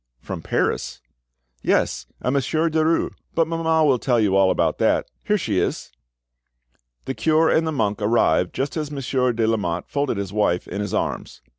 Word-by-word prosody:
"From - - -6
Paris?" - - -1 0.6
"Yes, 60 0 0 0.2
a 125 - +1
Monsieur 155 +4 0
Derues. 160 +1 +1 0.2
But 165 -1 +2
mamma 165 -1 +1
will 135 -4 +3
tell 120 -1 +1
you 100 -3 +2
all 95 -1 +5
about - - +1
that. - - +2 0.2
Here 210 - +2
she 105 - -1
is." - - -2 1.1
The 135 - -2
cure 160 +3 +2
and 160 0 +2
the - - 0
monk 105 -7 -1
arrived 105 -5 +2
just 135 +2 -2
as 150 -2 -3
Monsieur 130 -3 0
de 115 -1 0
Lamotte 95 -6 -1
folded 140 -6 -1
his 100 -1 -4
wife 95 -4 +1
in 100 +3 -4
his 105 - -3
arms. - - -3
125 Hz, 175 wpm, -22 LUFS, 105-155 Hz, 1.1 s, all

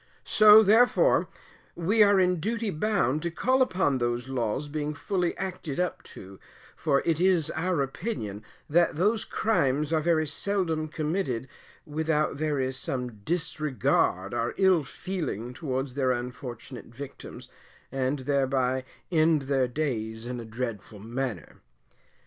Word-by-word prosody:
So, 215 0 +8
therefore, 245 - +4 0.5
we 195 +6 +2
are 205 -2 +6
in 180 -2 +2
duty 225 +4 -1
bound 155 - 0
to 170 - -1
call 260 +9 +1
upon 185 - +2
those 120 +1 -1
laws 130 +2 -2
being 150 0 -3
fully 180 +2 -1
acted 180 -6 -4
up 180 -1 -1 0.2
to, 95 0 -11 0.4
for 140 - +1
it 165 -2 +1
is 175 -4 +3
our 165 -2 0
opinion 130 - -5 0.2
that 170 +2 +3
those 210 +7 +1
crimes 150 -8 0
are 160 - +3
very 160 -1 +2
seldom 160 0 -1
committed 150 -5 -2 0.4
without 155 0 0
there 150 -1 -1
is 130 0 -1
some 125 -4 -4
disregard 150 - 0
or 115 +1 -1
ill 190 -5 +4
feeling 135 - -5
towards 130 -3 -3
their 130 -1 +1
unfortunate 125 0 -6
victims, 130 +4 -10 0.4
and 135 +2 -1
thereby 130 -1 +1 0.3
end 160 -3 +3
their 135 -1 +1
days 115 -5 -3
in 125 0 -4
a 115 - -7
dreadful 110 -2 -5
manner. 120 +3 -5
150 Hz, 135 wpm, -27 LUFS, 125-180 Hz, 0.5 s, So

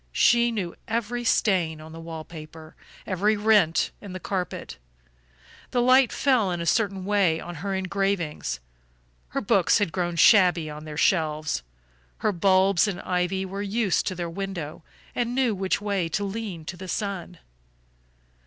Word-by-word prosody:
She 235 0 +4
knew 190 -7 -3
every 235 +2 -2
stain 180 -9 +2
on 155 +1 -11
the 165 - -9
wall 165 -1 -7
paper, 155 -1 -11 0.3
every 205 +3 +1
rent 205 -6 +3
in 200 -3 -8
the 185 - -5
carpet; 185 - -4 0.9
the 250 - 0
light 255 +1 +5
fell 250 -8 +2
in 175 -1 -2
a 170 - -3
certain 195 -1 +1
way 195 -5 +2
on 175 - -7
her 195 0 -2
engravings, 190 - -1 0.7
her - - -3
books 200 -4 +3
had 205 -6 0
grown 175 -1 -2
shabby 175 -4 +5
on 150 +1 -9
their 150 -1 -7
shelves, 155 -3 +1 0.6
her 215 - +1
bulbs 190 +1 +3
and 195 -3 -3
ivy 180 +1 -1
were 195 +2 -5
used 205 -1 0
to 185 - -2
their 175 -1 -3
window 170 -4 -5 0.3
and 240 0 -1
knew 255 -4 +2
which 190 -1 -1
way 200 -5 -1
to 205 +6 -1
lean 200 -5 -5
to 175 - -6
the 185 - -8
sun. 185 -3 -4
190 Hz, 160 wpm, -25 LUFS, 170-205 Hz, 0.9 s, light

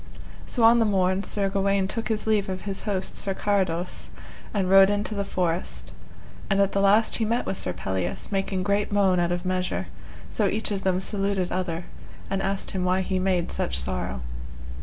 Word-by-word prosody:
So 240 - 0
on 230 +1 +7
the 225 - +4
morn 190 -2 +2
Sir 200 -1 -1
Gawaine 195 0 +1
took 230 +2 -3
his 215 -1 0
leave 210 -3 +1
of 185 0 -4
his 195 -2 -4
host 190 -2 -2
Sir 195 -1 +1
Carados, 185 -4 -1 0.4
and 195 -3 0
rode 195 +1 +7
into 205 +1 -1
the 200 -1 -1
forest; 180 -3 -2 0.6
and 195 -1 +2
at 200 -1 +3
the 195 - +1
last 205 +3 +4
he 225 - 0
met 230 +3 0
with - - -2
Sir - - -1
Pelleas, 90 - -3
making 195 -1 -1
great 200 +2 0
moan 195 -3 +3
out 175 0 +1
of 175 +1 -2
measure, 185 0 -1 0.4
so 210 - +1
each 215 +1 0
of 195 -1 -1
them 185 -1 +1
saluted 195 -2 -1
other, 175 -2 -2 0.5
and 195 0 0
asked 195 0 -1
him 185 -1 -2
why 185 +1 +2
he 185 0 -1
made 185 -2 0
such 60 +1 0
sorrow. 65 0 -2
195 Hz, 195 wpm, -25 LUFS, 185-205 Hz, 0.6 s, on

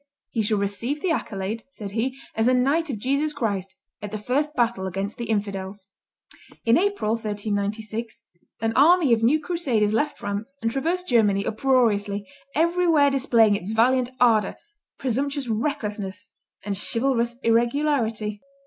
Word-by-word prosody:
"He 225 - 0
shall 215 0 +1
receive 205 +8 -2
the 360 +2 0
accolade," 215 -5 -3
said 205 -5 -7
he, 250 +5 -2 0.2
"as 225 +1 +1
a 255 - +4
knight 290 +6 +2
of 250 - -2
Jesus 280 +7 0
Christ, 200 -8 -3 0.3
at 210 - -5
the 215 - -4
first 280 +8 -1
battle 235 -6 0
against 195 +3 -4
the 235 -2 -5
infidels." 200 -2 -3 0.8
In 230 0 +5
April, 400 - 0
1396, 215 +1 -3 0.4
an 225 0 0
army 305 -1 +5
of 225 - +2
new 260 +7 +4
crusaders 275 -11 0
left 290 +6 0
France 210 +7 -5
and 230 0 -1
traversed 340 +8 -1
Germany 205 -5 +3
uproariously, 215 -5 +1 0.3
everywhere 330 -3 +3
displaying 235 -6 +4
its 200 +2 -4
valiant 250 +2 +3
ardor, 220 -5 +3 0.4
presumptuous 270 +2 -2
recklessness, 210 -4 -3 0.4
and 205 -1 -2
chivalrous 235 +3 +1
irregularity. 230 -3 +1
230 Hz, 140 wpm, -24 LUFS, 210-275 Hz, 0.8 s, In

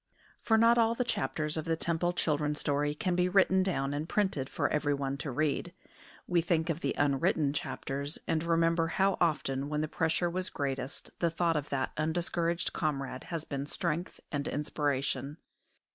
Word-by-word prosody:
For 225 - +3
not 230 +1 +5
all 230 0 +3
the 250 - +1
chapters 150 - -1
of 155 - -2
the 165 -1 +1
Temple 170 +1 0
children's 150 -3 0
story 145 +1 +1
can 180 +3 0
be 180 0 +2
written 190 0 +4
down 145 -7 0
and 150 +3 -3
printed 190 -11 0
for - - 0
everyone 140 -2 0
to 150 0 -4
read. 155 +6 -1 0.5
We 175 -2 +2
think 165 -1 +1
of 160 - -3
the - - -1
unwritten 145 +1 +2
chapters, 140 0 -2
and 160 - +1
remember 165 0 +2
how 195 +3 +2
often 140 -4 +1
when 150 0 0
the 155 - -1
pressure 160 +3 0
was 185 +2 -2
greatest 135 -1 -3
the 170 - +2
thought 165 0 +1
of 145 -1 -2
that 135 -1 -1
undiscouraged 170 +2 0
comrade 135 -4 -2
has 165 -2 -4
been 140 0 -4
strength 170 +2 -2
and 145 -2 -2
inspiration. 145 0 -1
155 Hz, 175 wpm, -31 LUFS, 145-175 Hz, 0.5 s, not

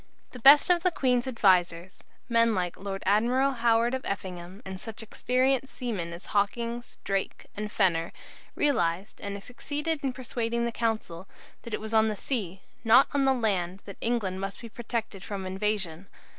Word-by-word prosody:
The 250 - -10
best 280 +7 +8
of 350 -1 +3
the 365 - +3
Queen's 255 -6 +1
advisers, 185 -6 +2 0.3
men 230 -2 +3
like 180 -2 -1
the - - -19
Lord 195 -1 -5
Admiral 245 +7 +3
Howard 235 -1 +2
of 260 - -2
Effingham, 185 0 -5
and 190 -1 -6
such 225 +2 -7
experienced 260 +4 0
seamen 210 -10 -3
as 170 +2 -9
Hawkins, 235 +4 -1
Drake, 195 -1 -2
and 210 0 -4
Fenner, 170 -5 +1 0.4
realized, 195 - 0
and 200 0 -5
succeeded 295 +6 -3
in 270 - 0
persuading 235 -2 -2
the 235 - -1
Council, 215 -7 -2 0.3
that 235 - -4
it - - -6
was 220 +1 -6
on 220 0 +5
the 215 - -1
sea, 195 -5 -2 0.2
and - - -34
not 235 +5 +6
on 280 -1 +2
the 270 - +5
land, 195 -5 -1
that 200 - -9
England 200 -6 -1
must 195 0 -5
be 230 - -9
protected 225 -4 -4
from 195 -2 -5
invasion. 190 -2 -2
220 Hz, 175 wpm, -28 LUFS, 190-245 Hz, 0.4 s, best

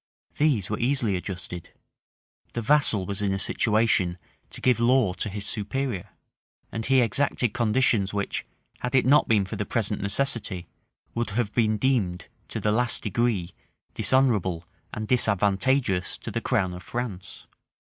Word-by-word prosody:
These 135 -11 +2
were 105 - -3
easily 120 -5 +1
adjusted: 90 -2 -6 0.8
the 120 - -2
vassal 115 -7 +3
was 100 +1 -3
in 100 -1 +1
a - - -1
situation 105 -5 +2 0.3
to - - -7
give 125 -3 +2
law 120 -4 +3
to 105 - -3
his 100 +1 -3
superior; 105 -1 -3 0.6
and 110 - -4
he 130 +2 +4
exacted 120 -1 +1
conditions 110 -4 +2
which, 100 -1 -2 0.4
had 125 +1 -2
it 130 - +4
not 140 +3 +5
been 105 -3 +3
for 95 - -6
the - - -1
present 105 -3 -1
necessity, 100 -4 -1 0.5
would 115 -2 -2
have 105 0 -1
been 110 -2 +2
deemed, 100 -8 0 0.2
to - - -4
the 105 - +1
last 120 +2 0
degree, 105 -4 0 0.4
dishonorable 105 -11 +2 0.3
and 110 0 -5
disadvantageous 105 -2 +1
to - - -7
the - - -2
crown 90 -1 0
of 90 - -8
France. 100 -1 -5
110 Hz, 150 wpm, -26 LUFS, 95-125 Hz, 0.8 s, not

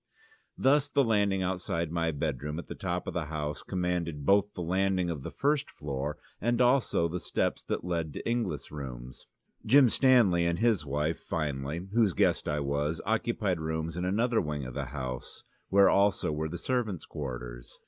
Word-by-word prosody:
Thus 145 +2 +4
the 140 -1 +2
landing 100 -4 +2
outside 90 -3 -2
my 85 -1 0
bedroom 75 -1 -3
at 85 - -5
the - - -7
top 90 -1 -3
of - - -4
the 85 -3 -2
house 75 -2 -4
commanded 90 -5 -2
both 100 +3 +3
the 90 - -3
landing 95 0 +1
of 75 -5 -5
the - - -5
first 145 +1 0
floor 70 0 -4 0.2
and 120 +2 +1
also 125 -8 +3
the 90 +2 -3
steps - - -1
that - - -2
led 85 -3 -2
to - - -6
Inglis' 120 0 -2
rooms. 65 -4 -8 0.4
Jim 130 +2 +6
Stanley 115 -10 +4
and 85 0 0
his 105 -8 +2
wife, 75 +3 -1
finally 75 +3 -3
(whose 110 -5 +3
guest - - +2
I 75 0 0
was), 70 +3 -1
occupied 105 -4 0
rooms 80 +1 -3
in 90 - -3
another 110 +5 +2
wing 75 -4 -3
of 65 - -7
the - - -3
house, 65 -3 -6 0.3
where 100 0 +6
also 100 -5 +3
were 80 +1 -2
the 85 - -5
servants' 115 -9 -2
quarters. - - -7
85 Hz, 180 wpm, -29 LUFS, 75-100 Hz, 0.4 s, Jim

